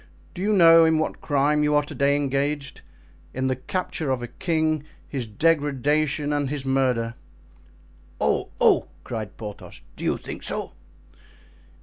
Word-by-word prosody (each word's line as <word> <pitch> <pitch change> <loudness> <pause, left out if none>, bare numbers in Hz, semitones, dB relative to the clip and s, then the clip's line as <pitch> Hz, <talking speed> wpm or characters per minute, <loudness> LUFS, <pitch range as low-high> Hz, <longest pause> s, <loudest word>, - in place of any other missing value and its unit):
Do 180 - -7
you 210 +2 +2
know 165 -3 +8
in 160 -1 +4
what 155 - -2
crime 145 +1 +2
you 150 0 +2
are 145 - +4
to 145 - -9
day 140 0 +2
engaged? 140 0 -1 0.5
In 130 +1 -1
the 130 0 +1
capture 155 +2 -3
of 130 -2 -1
a - - -4
king, 155 -1 -1 0.2
his 130 -5 -4
degradation 145 +3 +1
and 145 -2 0
his 145 -2 -4
murder." 130 -4 +1 1.1
"Oh! - - +1
oh!" - - +4 0.2
cried 110 -4 -6
Porthos, 105 -2 -9
"do - - -9
you - - +1
think - - -8
so?" - - -4
145 Hz, 150 wpm, -24 LUFS, 130-155 Hz, 1.1 s, know